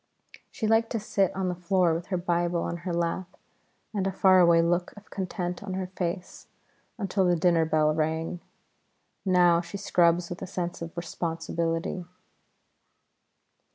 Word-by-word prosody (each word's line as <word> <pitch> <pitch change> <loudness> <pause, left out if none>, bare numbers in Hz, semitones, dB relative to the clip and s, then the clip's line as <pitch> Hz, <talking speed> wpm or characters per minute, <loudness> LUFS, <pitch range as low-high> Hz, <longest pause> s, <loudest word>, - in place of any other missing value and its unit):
She 220 - -4
liked 225 +1 +3
to 225 - 0
sit 200 -2 +1
on 190 -1 -1
the 180 - 0
floor 180 -1 +2
with 170 +2 -4
her 185 - -1
Bible 175 -1 0
on 170 - -3
her 175 +1 -5
lap 170 +2 -2 0.6
and 195 -2 0
a - - 0
far 190 0 +5
away 170 -1 +6
look 175 +1 0
of 205 - -15
content 180 -2 -3
on 190 -2 -5
her 190 0 -2
face 180 0 -4 0.5
until 195 -2 0
the 180 -1 +3
dinner 170 -1 +3
bell 155 -1 +2
rang. 160 +2 -1 0.9
Now 175 -2 +4
she 175 +3 -7
scrubs 175 -3 +2
with 175 - -6
a - - -5
sense 175 -2 -4
of 165 +1 -7
responsibility. 165 +1 -3
175 Hz, 155 wpm, -27 LUFS, 170-185 Hz, 0.9 s, away